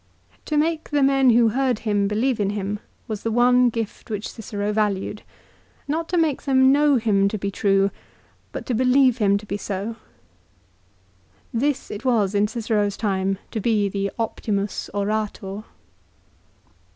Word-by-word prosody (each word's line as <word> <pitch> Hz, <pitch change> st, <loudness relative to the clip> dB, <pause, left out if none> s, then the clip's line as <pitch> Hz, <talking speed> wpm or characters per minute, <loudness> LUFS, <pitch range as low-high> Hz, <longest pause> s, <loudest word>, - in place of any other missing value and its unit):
To 305 Hz, -, -1 dB
make 315 Hz, +1 st, 0 dB
the 290 Hz, -2 st, +2 dB
men 270 Hz, -1 st, +4 dB
who 235 Hz, -1 st, +5 dB
heard 255 Hz, 0 st, +1 dB
him 205 Hz, -2 st, +1 dB
believe 225 Hz, +4 st, 0 dB
in 200 Hz, -1 st, +1 dB
him 205 Hz, 0 st, -3 dB, 0.3 s
was 215 Hz, -3 st, -4 dB
the 230 Hz, -, -2 dB
one 245 Hz, +2 st, +4 dB
gift 225 Hz, -1 st, -5 dB
which 210 Hz, -1 st, -4 dB
Cicero 210 Hz, -2 st, -4 dB
valued; 210 Hz, -1 st, -1 dB, 0.7 s
not 320 Hz, +3 st, -2 dB
to 355 Hz, -, 0 dB
make 320 Hz, -5 st, +1 dB
them 260 Hz, -1 st, +4 dB
know 290 Hz, 0 st, +4 dB
him 210 Hz, -5 st, +2 dB
to 215 Hz, -, -2 dB
be 200 Hz, 0 st, -3 dB
true, 195 Hz, 0 st, +2 dB, 0.6 s
but -, -, -6 dB
to 250 Hz, -, -2 dB
believe 255 Hz, +1 st, +3 dB
him 200 Hz, -2 st, +3 dB
to 205 Hz, -, -9 dB
be 200 Hz, 0 st, -3 dB
so. 205 Hz, +3 st, -4 dB, 1.6 s
This 275 Hz, +4 st, -1 dB
it 210 Hz, -, -6 dB
was 220 Hz, -6 st, +2 dB
in 205 Hz, +1 st, +2 dB
Cicero's 210 Hz, -3 st, -1 dB
time 195 Hz, -2 st, 0 dB
to 225 Hz, -, -2 dB
be 210 Hz, -2 st, +1 dB
the 200 Hz, 0 st, -2 dB
" -, -, -37 dB
Optimus 210 Hz, -3 st, -2 dB
Orator." 205 Hz, 0 st, -3 dB
215 Hz, 160 wpm, -23 LUFS, 200-250 Hz, 1.6 s, who